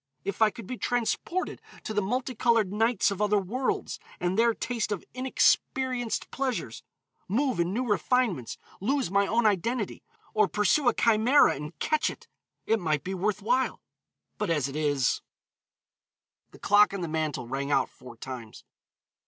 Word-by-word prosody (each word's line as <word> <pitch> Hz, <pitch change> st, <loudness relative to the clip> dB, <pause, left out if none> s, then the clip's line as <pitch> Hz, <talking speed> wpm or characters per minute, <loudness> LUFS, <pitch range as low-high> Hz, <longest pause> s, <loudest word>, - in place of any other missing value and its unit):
If 200 Hz, +2 st, -4 dB
I 220 Hz, -, +7 dB
could 225 Hz, 0 st, -10 dB
be 250 Hz, +4 st, -6 dB
transported 245 Hz, +9 st, -1 dB, 0.2 s
to 215 Hz, -, -4 dB
the 210 Hz, -, +1 dB
multicolored 230 Hz, -2 st, +1 dB
nights 225 Hz, -1 st, +2 dB
of 200 Hz, +1 st, -4 dB
other 210 Hz, 0 st, +3 dB
worlds, 230 Hz, +7 st, -2 dB, 0.2 s
and 180 Hz, +1 st, 0 dB
there 230 Hz, +1 st, +3 dB
taste 230 Hz, -4 st, -2 dB
of 205 Hz, -, -2 dB
inexperienced 255 Hz, -1 st, +1 dB
pleasures, 265 Hz, -2 st, -3 dB, 0.5 s
move 250 Hz, +3 st, 0 dB
in 170 Hz, +1 st, +1 dB
new 245 Hz, +6 st, -1 dB
refinements, 210 Hz, -, 0 dB, 0.2 s
lose 260 Hz, 0 st, 0 dB
my 200 Hz, 0 st, +3 dB
own 230 Hz, +2 st, +1 dB
identity, 215 Hz, +2 st, 0 dB, 0.3 s
or 215 Hz, -2 st, +4 dB
pursue 210 Hz, +8 st, +2 dB
a -, -, +5 dB
chimera 230 Hz, +5 st, +4 dB
and 150 Hz, +3 st, -8 dB
catch 310 Hz, -, +1 dB
it, -, -, -10 dB, 0.4 s
it 225 Hz, -, +2 dB
might 155 Hz, -5 st, 0 dB
be 190 Hz, -, -4 dB
worth 200 Hz, +2 st, -1 dB
while, 250 Hz, +4 st, +1 dB, 0.6 s
but, -, -, -1 dB
as 150 Hz, -5 st, +1 dB
it 140 Hz, -, -7 dB
is 145 Hz, -4 st, +1 dB, 0.6 s
" -, -, -57 dB
The -, -, -14 dB
clock 205 Hz, 0 st, +4 dB
on 195 Hz, -, -4 dB
the 170 Hz, -, -2 dB
mantel 155 Hz, -5 st, -2 dB
rang 140 Hz, +3 st, -3 dB
out 135 Hz, -2 st, +3 dB
four 125 Hz, -2 st, -14 dB
times. 120 Hz, -3 st, -8 dB
210 Hz, 160 wpm, -28 LUFS, 175-245 Hz, 0.6 s, I